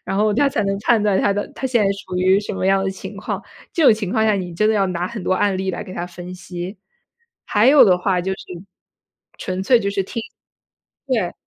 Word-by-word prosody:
然 195 - -3
后 210 0 +3
她 280 +3 +3
才 215 - 0
能 195 0 -1
判 225 0 +3
断 205 -2 +2
她 200 - +2
的 205 +1 -3
她 265 - -2
现 240 -4 +2
在 195 - +2
属 195 -2 -7
于 185 +1 +4
什 205 - -5
么 190 - -2
样 195 0 +3
的 195 - 0
情 190 - -9
况， - - -4 0.3
这 330 - 0
种 270 - +8
情 205 -3 -4
况 220 - +2
下 215 -1 +3
你 180 -3 -4
真 215 +5 +2
的 220 - +2
要 195 -2 +2
拿 180 0 -2
很 215 -5 -7
多 - - +1
案 195 +1 +1
例 190 0 -1
来 - - -4
给 185 - -10
她 175 - -4
分 175 0 -9
析。 180 +2 -7 0.7
还 210 +2 +3
有 285 +1 +8
的 180 -2 +5
话 180 -1 0
就 185 +2 -3
是 190 - -6 1.0
纯 185 0 -3
粹 240 +3 +4
就 200 - -1
是 200 -1 -1
听。 230 +4 -5 0.8
对， 225 -10 0
195 Hz, 265 characters per minute, -20 LUFS, 185-215 Hz, 1.0 s, 种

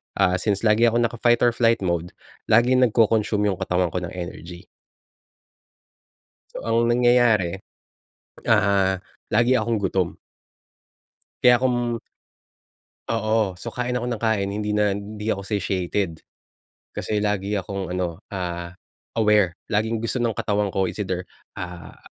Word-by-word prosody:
ah, 90 -2 +2
since 100 +1 -1
lagi 110 +2 +4
akong 120 +1 +2
naka-fight 120 0 +2
or 120 - +5
flight 115 -2 +2
mode, 85 -1 -2 0.3
laging 120 +3 +4
nagko-consume 110 -3 +3
yung 95 - -5
katawan 90 -1 0
ko 90 - -1
ng 90 -1 -6
energy. 85 -1 -7 1.9
So, - - -5
ang 115 +1 +2
nangyayari, 120 -7 +3 0.8
ah, 95 -2 +3 0.3
lagi 120 +4 +4
akong 110 -2 -1
gutom. 95 -2 0 1.3
Kaya 125 0 +7
kung 120 -2 0 1.1
Oo. 110 -4 0
So, - - -7
kain 125 0 -2
ako 120 - -3
ng 115 - -4
kain, 105 -4 +1
hindi 105 0 -2
na 105 -1 +2
hindi 105 +2 -4
ako 100 - -6
satiated. 95 -4 -2 0.7
Kasi 105 - -2
lagi 105 0 0
akong 95 0 -4
ano, 90 -2 -3
ah, 85 -3 -4 0.5
aware. 105 -5 +3
Laging 110 +1 0
gusto 115 +3 -2
ng 115 -3 0
katawan 105 0 0
ko 95 0 0
it's 105 - -4
either, 95 -2 -3 0.3
ah, 90 -1 -8
105 Hz, 135 wpm, -23 LUFS, 95-115 Hz, 1.9 s, Kaya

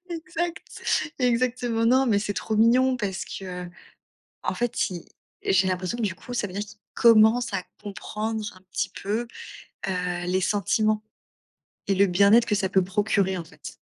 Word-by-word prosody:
Exact, 335 -1 -3
exactement. 245 -2 +1
Non, 260 +2 +4
mais 205 -3 +3
c'est 205 -1 -3
trop 220 -1 -2
mignon 250 +3 +4
parce 195 -5 -3
que, 180 -2 -6
heu, - - -11 0.7
en - - -1
fait, 240 -3 -1
il 175 -2 -7 0.4
j'ai 190 0 +3
l'impression 185 +5 -2
que 235 - -4
du 190 -5 0
coup, 245 - -9
ça 210 - 0
veut 180 - -10
dire 200 - -3
qu'il 205 0 -11 0.2
commence 230 0 +5
à 185 - -1 0.2
comprendre 215 +2 -4
un - - -16
petit - - -1
peu, 215 +4 -1 0.6
heu, 180 -1 -2
les 185 +1 +1
sentiments 215 +2 +1 0.9
et 195 - +3
le 200 +1 +4
bien-être 200 +6 +5
que 210 - +1
ça 195 -2 0
peut 190 -1 +4
procurer 195 -1 +1
en 170 - -5
fait. 160 - -11
210 Hz, 175 wpm, -25 LUFS, 190-235 Hz, 0.9 s, commence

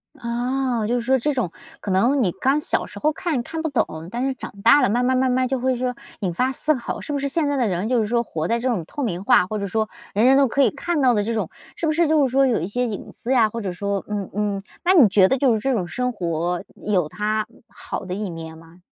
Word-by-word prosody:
啊， 240 -1 -1
就 240 - +1
是 245 - 0
说 260 +3 +2
这 295 +5 0
种， 245 -10 -1 0.3
可 200 - -4
能 240 +8 +3
你 180 - +1
刚 275 +3 +3
小 300 - -1
时 205 - -12
候 305 - +2
看 325 -8 -2
看 320 +5 -5
不 320 - -1
懂， 165 - -2
但 240 +6 -2
是 270 - 0
长 260 - -8
大 290 - +7
了 255 - +3
慢 245 +4 +1
慢 260 +1 +2
慢 260 0 +2
慢 255 0 +1
就 265 0 -1
会 260 +1 +1
说 250 0 -2 0.3
引 185 -4 -1
发 255 +9 +1
思 305 +4 +2
考。 245 - -4
是 295 - -5
不 285 - 0
是 280 - -1
现 305 +1 0
在 285 - 0
的 250 -4 +1
人， 185 +2 -1
就 250 -1 +2
是 215 - 0
说 235 +1 +1
活 160 -6 -3
在 230 - +1
这 240 +2 -2
种 225 -9 0
透 290 - -5
明 185 -5 -2
化， 240 -5 +5
或 215 +3 -4
者 200 - -3
说 220 +2 0 0.3
人 215 +4 +3
人 265 +1 +6
都 275 - +5
可 280 +3 +2
以 - - +3
看 320 +2 -2
到 255 -2 +5
的 210 -2 +1
这 230 - -2
种 215 -7 -2 0.3
是 330 - -3
不 310 - +2
是 335 +1 +2
就 305 -2 +4
是 - - -7
说 270 +1 +4
有 245 - +1
一 165 - -2
些 245 +5 -1
隐 210 - -6
私 245 - -5
呀， 230 -5 +4
或 230 +1 -5
者 190 - -3
说 200 +2 -2
嗯 205 -2 -3
嗯， 205 -1 -2 0.2
那 365 - +4
你 300 - +7
觉 195 -1 +5
得 265 - +1
就 255 -2 +3
是 220 - 0
这 270 +5 0
种 190 -8 -1
生 250 +4 -2
活 175 -3 -2 0.2
有 185 -7 +1
它 215 +5 -1 0.2
好 235 - -7
的 180 - -4
一 205 -1 -3
面 160 -1 -8
吗？ 165 +2 -17
235 Hz, 305 characters per minute, -22 LUFS, 200-265 Hz, 0.3 s, 大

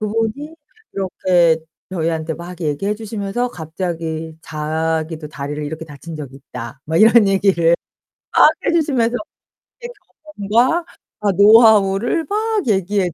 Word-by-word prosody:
그분이 225 +8 -2 0.4
이렇게 180 -3 +2 0.3
저희한테 160 -2 -2
막 175 +2 -10
얘기해 165 +6 -1
주시면서 215 +2 -3
갑자기 160 -3 -5
자기도 155 0 -3
다리를 150 +1 -5
이렇게 160 +2 -6
다친 155 +2 -9
적이 135 -3 -8
있다 125 0 -9
뭐 160 +2 -2
이런 220 +1 +6
얘기를 190 -4 +3 0.6
막 - - +8 0.2
해 - - +2
주시면서 260 -8 +1 0.7
예 - - -4 0.6
경험과 255 +11 +3 0.4
아 205 -1 +1
노하우를 215 - +5
막 430 0 -1
얘기해 195 -3 +1
185 Hz, 280 characters per minute, -19 LUFS, 160-220 Hz, 0.7 s, 막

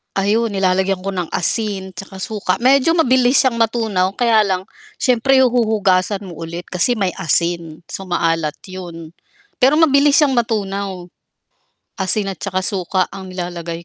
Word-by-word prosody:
ayun 210 +4 +1
nilalagyan 190 -1 0
ko 195 - -2
ng 180 -3 -3
asin 190 +1 +1
tsaka 195 +1 -10
suka, 205 -4 -2
medyo 275 +5 +4
mabilis 260 -4 +3
siyang 235 -3 0
matunaw 215 -5 0
kaya 230 -3 +3
lang, 185 -1 -1 0.3
siyempre 260 +1 +3
huhugasan 210 -5 +1
mo 175 -4 -10
ulit 170 +2 -6
kasi 190 +7 +2
may 195 -4 -1
asin, 170 -2 0
so 195 -1 -6
maalat 165 -3 0
yun. 170 -4 -9 0.5
Pero 270 +4 +5
mabilis 285 -2 +4
siyang 290 -4 +3
matunaw. 200 -5 -2 0.9
Asin 195 +2 0
tsaka 185 -1 -3
suka 185 -1 -1
ang 190 -1 -9
nilalagay 170 -2 -6
195 Hz, 140 wpm, -18 LUFS, 180-230 Hz, 0.9 s, Pero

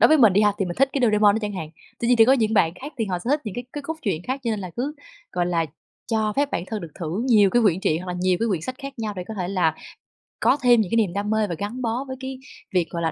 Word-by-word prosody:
đối - - +7
với 310 0 +5
mình 225 -7 +6
nha 205 +1 +4
thì 195 - +1
mình 175 -1 -5
thích 275 0 +4
cái 280 - -1
Doraemon 210 -2 +4
đó - - +1
chẳng 205 -1 -2
hạn, 160 -5 -5 0.3
tuy 235 - -1
nhiên 245 - +5
thì 225 - +7
có 260 - +5
những 220 -4 +2
bạn 165 -5 +3
khác 285 +9 -9
thì 225 - +1
họ 180 -3 -2
sẽ 235 +9 -4
thích 295 +1 +2
những 210 -4 -5
cái 245 - -5
cái 290 - -5
cốt 320 +3 -4
truyện 180 -8 -1
khác. 265 +2 -3
Cho 235 - 0
nên 215 -2 -2
là 185 -2 -6
cứ, 275 +5 -2 0.4
gọi 175 -1 0
là, 170 -2 +1 0.4
cho 220 -2 0
phép 285 0 +1
bản 175 - -2
thân 215 -2 -4
được 165 - -8
thử 170 +6 -2
nhiều 210 -4 +5
cái 240 +2 +3
quyển 190 -3 +3
truyện, 170 -3 0
hoặc - - -9
là 180 - -5
nhiều 185 -1 +3
cái 230 - +1
quyển 180 -6 0
sách 255 +10 -5
khác 275 -2 -8
nhau 215 -2 -3
để 180 -2 -5
có 220 - -5
thể 180 -3 -3
là 175 -5 +1 0.7
có - - +3
thêm 240 -3 +5
những 185 - -3
cái 230 - +2
niềm 205 -6 +2
đam 205 +1 -2
mê 220 -1 +1
và 170 - -2
gắn 210 +7 -4
bó 235 +2 -1
với 260 - -5
cái 265 0 -6 0.3
việc, 180 -2 +1
gọi 170 - -4
là, 165 - 0
215 Hz, 330 wpm, -23 LUFS, 180-245 Hz, 0.7 s, đối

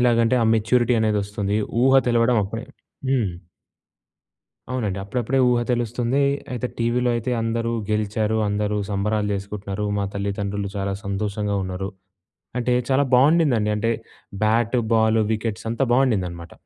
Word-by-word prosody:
ఎలాగంటే 120 0 +3
ఆ - - +3
మెచ్యూరిటీ 120 +2 +2
అనేదొస్తుంది. 105 -1 0 0.3
ఊహ 135 +1 +6
తెలవడం 120 0 +3
అప్పుడే 110 +3 -5 0.4
హ్మ్. 120 -8 +1 1.4
అవునండి. 105 -7 -2
అప్పుడప్పుడే 125 +5 -1
ఊహ 120 -1 +3
తెలుస్తుంది. 120 +3 0 0.3
అయితే 125 0 -2
టీవీలో 120 +1 +1
అయితే 115 +2 -2
అందరూ 115 +1 -1 0.2
గెలిచారు. 105 +1 0
అందరూ 105 0 -1
సంబరాలు 105 +1 0
చేసుకుంటున్నారు. 100 +1 -4
మా 100 - 0
తల్లిదండ్రులు 100 0 -3
చాలా 100 0 -1
సంతోషంగా 100 +1 -2
ఉన్నారు. 95 +1 -4 0.7
అంటే 125 0 0 0.2
చాలా 135 +1 +4
బాగుండదండి. 130 -5 +4
అంటే 115 +2 0 0.5
బ్యాటు, 115 +3 +2
బాలు, 110 0 +3
వికెట్స్ 110 0 -3
అంతా 115 +4 0
బాగుండదనమాట. 95 -10 0
110 Hz, 125 wpm, -23 LUFS, 100-120 Hz, 1.4 s, ఊహ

